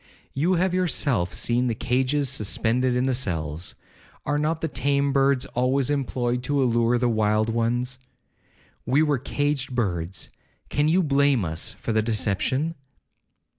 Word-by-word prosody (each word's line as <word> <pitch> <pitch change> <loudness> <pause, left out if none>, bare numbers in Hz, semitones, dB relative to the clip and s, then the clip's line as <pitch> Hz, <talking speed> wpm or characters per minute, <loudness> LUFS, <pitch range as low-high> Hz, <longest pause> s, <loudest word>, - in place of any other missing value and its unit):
You 170 +7 +1
have 180 +1 +1
yourself 140 - +1
seen 120 +1 0
the 115 - -1
cages 130 +5 0
suspended 125 +1 0
in 125 +1 +1
the 130 - +1
cells—are 90 - -4
not 155 +2 -1
the 160 - 0
tame 140 +1 0
birds 135 -1 +2
always 130 +2 0
employed 125 -3 -1
to 140 0 +1
allure 120 0 +2
the 125 0 +1
wild 110 -1 +1
ones? 120 +3 -1 0.8
We 135 +6 +3
were 145 -4 +1
caged 140 -1 -2
birds, 90 -6 -2 0.4
can 145 +1 +1
you 180 +4 +3
blame 140 - +2
us 80 +1 -3
for 115 - -4
the 110 - +3
deception?' 115 - 0
125 Hz, 140 wpm, -24 LUFS, 115-140 Hz, 0.8 s, We